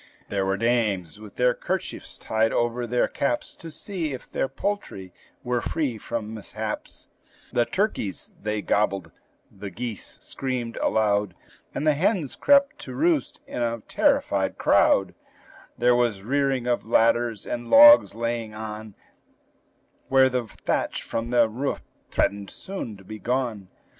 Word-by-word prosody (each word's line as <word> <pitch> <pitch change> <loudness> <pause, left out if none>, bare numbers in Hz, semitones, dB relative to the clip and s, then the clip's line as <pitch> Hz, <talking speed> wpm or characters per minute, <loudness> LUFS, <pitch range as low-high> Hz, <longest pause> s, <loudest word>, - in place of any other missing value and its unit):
There 95 -1 0
were 95 0 +1
dames 105 -6 0
with 105 -2 -12
their 125 0 +3
kerchiefs - - -4
tied 110 0 +1
over 120 +1 0
their 120 +1 +2
caps, 125 -4 -2
To 165 - -8
see 160 -1 -4
if 130 - -8
their - - -1
poultry 135 - -4 0.3
were 120 -1 0
free 135 -8 -2
from 110 0 -4
mishaps; 110 0 -6 0.5
The 120 - +3
turkeys, 190 - -2
they 105 0 -2
gobbled, 100 -3 0 0.4
the 100 +1 -8
geese 115 +2 -6
screamed 125 -4 -4
aloud, 105 -3 +1 0.4
And 150 - -2
the 155 - +5
hens 165 - 0
crept 280 0 +4
to - - -7
roost 325 -2 +1
in - - -5
a 115 -1 -1
terrified - - +1
crowd; - - +3 0.6
There 120 +1 +4
was 115 -5 +1
rearing 135 +1 0
of 120 -1 0
ladders, 115 -1 +2
and 120 -1 -4
logs 295 - +8
laying 115 -1 -3
on, 110 -1 -7 1.1
Where 130 0 +5
the 125 -2 -1
thatch - - -2
from 115 +1 -3
the 120 -2 +4
roof 125 +6 -3 0.3
threatened 100 -1 0
soon 185 - -7
to 100 - -16
be 110 +2 -9
gone. 120 -5 -2
120 Hz, 145 wpm, -25 LUFS, 105-130 Hz, 1.1 s, logs